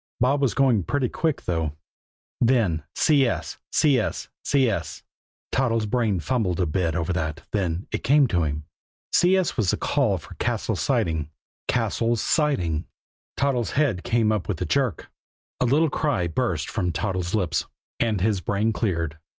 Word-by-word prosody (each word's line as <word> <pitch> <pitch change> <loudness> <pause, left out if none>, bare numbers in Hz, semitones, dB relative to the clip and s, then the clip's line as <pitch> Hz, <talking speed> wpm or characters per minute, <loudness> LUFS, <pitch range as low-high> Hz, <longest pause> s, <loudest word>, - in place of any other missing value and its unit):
Bob 135 +3 +2
was 135 -4 +1
going 130 -6 +3
pretty 135 +8 0
quick, 160 +4 -1
though. 80 -4 -1 0.7
Then 115 -10 +2
"CS 140 -6 +2
CS 140 -8 +1
CS" 130 -7 0 0.5
Toddles' 115 -4 +1
brain 105 -3 +1
fumbled 100 -3 -1
a 90 - +2
bit 80 0 0
over 85 +1 -1
that 80 -2 -3
then 90 -3 -1
it - - -3
came 140 +4 +5
to 90 - +1
him. 75 -1 -2 0.5
CS 185 0 +3
was 105 -6 +2
the - - +2
call - - +1
for - - -11
Cassil's - - -1
Siding. 80 -2 0 0.4
Cassil's 115 0 +1
Siding! 105 - +1 0.5
Toddles' 130 -5 0
head 140 -11 +1
came 115 -2 +2
up 105 -4 -1
with 95 -6 -2
a - - -2
jerk. 125 - -1 0.5
A - - +2
little 150 +5 +3
cry 140 - 0
burst 85 - -1
from 90 -6 -1
Toddles' 90 +1 -2
lips 90 -7 0 0.3
and 110 -5 +1
his 100 -2 +1
brain 105 +5 0
cleared. 85 -8 -2
110 Hz, 150 wpm, -24 LUFS, 85-130 Hz, 0.7 s, came